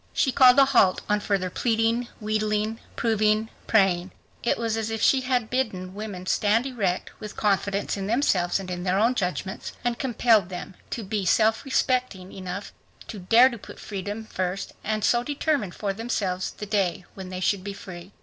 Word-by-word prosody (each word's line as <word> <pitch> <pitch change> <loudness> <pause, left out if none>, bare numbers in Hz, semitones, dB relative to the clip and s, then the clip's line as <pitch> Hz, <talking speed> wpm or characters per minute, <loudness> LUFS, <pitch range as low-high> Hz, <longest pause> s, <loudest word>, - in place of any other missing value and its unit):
She 265 - +2
called 255 0 +7
a 275 - +8
halt 240 -9 +3
on 210 0 +2
further 195 -3 -1
pleading, 230 +2 +1
wheedling, 215 0 -1 0.2
proving, 215 -1 +1 0.2
praying. 190 -4 +3 0.3
It 235 - +1
was 230 -1 -1
as 225 -1 -2
if 225 0 -3
she 265 +4 +4
had 250 -3 -1
bidden 190 -8 -2
women 200 -3 -6
stand 215 +5 +2
erect, 205 -9 -2
with 210 -1 -8
confidence 200 -1 0
in 195 0 -3
themselves 200 -7 +1
and 185 -2 -6
in 180 0 -4
their 185 0 +1
own 230 +5 +3
judgments, 190 0 -3
and 240 -1 0
compelled 230 -6 +3
them 180 +1 -7 0.2
to 230 - -4
be 205 0 -2
self 220 +4 +3
respecting 255 -8 0
enough 185 +1 -6 0.4
to 215 - -6
dare 230 +8 +6
to 235 -3 -8
put - - -11
their - - -13
freedom 205 +2 -5
first, 185 -2 -3
and 215 0 -1
so 240 +3 +3
determine 290 - -1
for 195 +2 -3
themselves 195 -4 -2
the 210 - -8
day 195 -4 0
when 190 -1 -8
they 185 0 -5
should 185 +1 0
be 200 0 -5
free. 185 -2 -10
210 Hz, 185 wpm, -25 LUFS, 190-230 Hz, 0.4 s, a